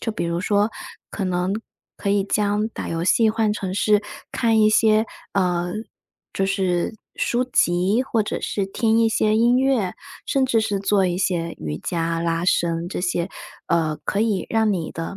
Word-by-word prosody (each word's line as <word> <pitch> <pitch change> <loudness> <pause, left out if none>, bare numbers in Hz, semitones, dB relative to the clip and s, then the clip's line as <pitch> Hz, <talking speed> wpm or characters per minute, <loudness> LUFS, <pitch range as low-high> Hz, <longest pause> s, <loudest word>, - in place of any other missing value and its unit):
就 225 - -2
比 215 - -3
如 170 0 -1
说， 205 +3 +2 0.4
可 200 - -3
能 180 0 0 0.4
可 200 - -4
以 200 0 +3
将 210 +1 0
打 - - -6
游 165 0 -2
戏 225 +4 +4
换 220 -1 +1
成 190 -3 -4
是 210 +1 +3 0.3
看 225 -2 +2
一 215 0 +5
些， 215 0 +4 0.3
呃， 175 -2 0 0.6
就 195 - 0
是 185 0 0 0.2
书 240 +1 +1
籍， 190 -1 +2
或 235 -5 +1
者 210 - -4
是 200 -2 -2
听 225 +3 +1
一 225 - +4
些 215 -1 +2
音 240 +2 +4
乐， 260 -9 +1 0.3
甚 270 -1 +2
至 230 -3 +2
是 210 -2 -1
做 195 0 +2
一 175 0 -1
些 170 -3 -1
瑜 75 -1 -4
伽 165 - -2
拉 165 0 -1
伸 170 -1 +1
这 180 - -4
些， 175 -1 -1 0.4
呃， 160 -3 +1
可 200 - -1
以 215 -4 0
让 220 -2 +2
你 170 -5 -3
的 165 +4 -5
200 Hz, 195 characters per minute, -22 LUFS, 175-220 Hz, 0.6 s, 一